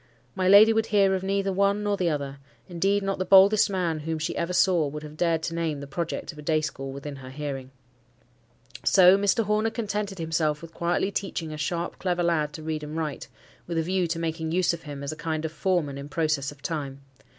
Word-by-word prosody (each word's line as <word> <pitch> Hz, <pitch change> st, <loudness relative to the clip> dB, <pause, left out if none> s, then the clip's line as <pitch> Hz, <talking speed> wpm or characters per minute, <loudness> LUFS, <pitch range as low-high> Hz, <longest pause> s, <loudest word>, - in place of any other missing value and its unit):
My 185 Hz, -1 st, 0 dB
lady 210 Hz, +3 st, +8 dB
would 225 Hz, 0 st, +1 dB
hear 200 Hz, -2 st, +3 dB
of 190 Hz, -, -1 dB
neither 195 Hz, 0 st, 0 dB
one 200 Hz, +2 st, +2 dB
nor 205 Hz, -1 st, +1 dB
the 180 Hz, -3 st, 0 dB
other: 140 Hz, -3 st, -3 dB, 0.3 s
indeed, 195 Hz, +4 st, 0 dB
not 195 Hz, -1 st, -2 dB
the -, -, +1 dB
boldest 195 Hz, +3 st, +6 dB
man 175 Hz, -5 st, -1 dB
whom 160 Hz, +1 st, -3 dB
she 155 Hz, -, -3 dB
ever 170 Hz, +1 st, -2 dB
saw 180 Hz, -4 st, +3 dB
would 150 Hz, +2 st, -6 dB
have 150 Hz, 0 st, -9 dB
dared 165 Hz, -1 st, +1 dB
to 165 Hz, -, -3 dB
name 165 Hz, -3 st, -2 dB
the 140 Hz, -, -7 dB
project 160 Hz, +5 st, -4 dB
of 155 Hz, -, -14 dB
a -, -, -7 dB
day 155 Hz, +1 st, +1 dB
school 135 Hz, -3 st, -5 dB
within 140 Hz, +1 st, -7 dB
her 130 Hz, -1 st, -10 dB
hearing. 135 Hz, -2 st, -5 dB, 1.1 s
So 185 Hz, 0 st, +7 dB
Mr. 205 Hz, +4 st, +2 dB
Horner 210 Hz, +1 st, +1 dB
contented 210 Hz, -3 st, -3 dB
himself 160 Hz, -2 st, 0 dB
with 165 Hz, -, -10 dB
quietly 175 Hz, +3 st, 0 dB
teaching 175 Hz, -5 st, -3 dB
a -, -, -5 dB
sharp, 170 Hz, +3 st, -3 dB
clever 180 Hz, -2 st, 0 dB
lad 155 Hz, -3 st, +1 dB
to 155 Hz, -, -8 dB
read 155 Hz, -1 st, -3 dB
and 150 Hz, +2 st, -6 dB
write, 155 Hz, -3 st, -4 dB, 0.4 s
with 170 Hz, -1 st, -3 dB
a 165 Hz, -, +2 dB
view 185 Hz, +1 st, 0 dB
to 165 Hz, +1 st, -2 dB
making 160 Hz, -1 st, -3 dB
use 175 Hz, 0 st, +2 dB
of 170 Hz, -, -6 dB
him 145 Hz, -2 st, -8 dB
as 140 Hz, -, -3 dB
a -, -, -6 dB
kind 160 Hz, 0 st, -3 dB
of 160 Hz, -, -3 dB
foreman 160 Hz, -4 st, -1 dB
in 140 Hz, +1 st, -8 dB
process 150 Hz, -3 st, 0 dB
of 145 Hz, -1 st, -17 dB
time. 140 Hz, -5 st, -4 dB
165 Hz, 230 wpm, -26 LUFS, 150-190 Hz, 1.1 s, lady